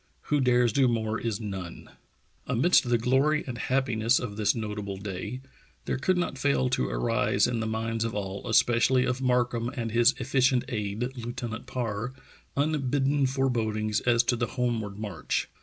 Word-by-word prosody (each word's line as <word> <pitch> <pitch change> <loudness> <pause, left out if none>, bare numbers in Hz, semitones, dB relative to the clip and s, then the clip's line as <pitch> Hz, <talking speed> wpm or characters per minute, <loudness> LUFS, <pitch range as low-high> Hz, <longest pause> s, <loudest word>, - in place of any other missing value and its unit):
Who 145 -1 +3
dares 125 -3 +3
do 135 0 +4
more 115 -2 -1
is 115 -4 -2
none." 95 -6 -6 0.6
Amidst 125 +1 +3
the 120 - +4
glory 135 +6 +2
and 125 -3 -6
happiness 125 -3 +1
of 110 -5 -4
this 105 +2 +1
notable 105 -3 -4
day, 100 +5 -5 0.4
there - - -2
could 185 +7 +1
not 175 -6 -2
fail 135 -2 +2
to 130 - 0
arise 115 -3 +1
in 120 -2 -1
the 110 - -2
minds 115 +1 -2
of 115 -1 -3
all, 100 +2 -4
especially 120 +3 +4
of 130 +1 -1
Markham 125 -2 +1
and 115 -3 -4
his 120 +3 +4
efficient 130 0 +2
aid, 110 +3 -3
Lieutenant 120 -1 -5
Parr, 115 0 -3 0.4
unbidden 140 -1 +1
forebodings 110 -5 0
as 120 -1 +3
to 120 - +1
the 120 0 -1
homeward 115 -5 -2
march. 100 -7 -3
120 Hz, 160 wpm, -27 LUFS, 110-130 Hz, 0.6 s, do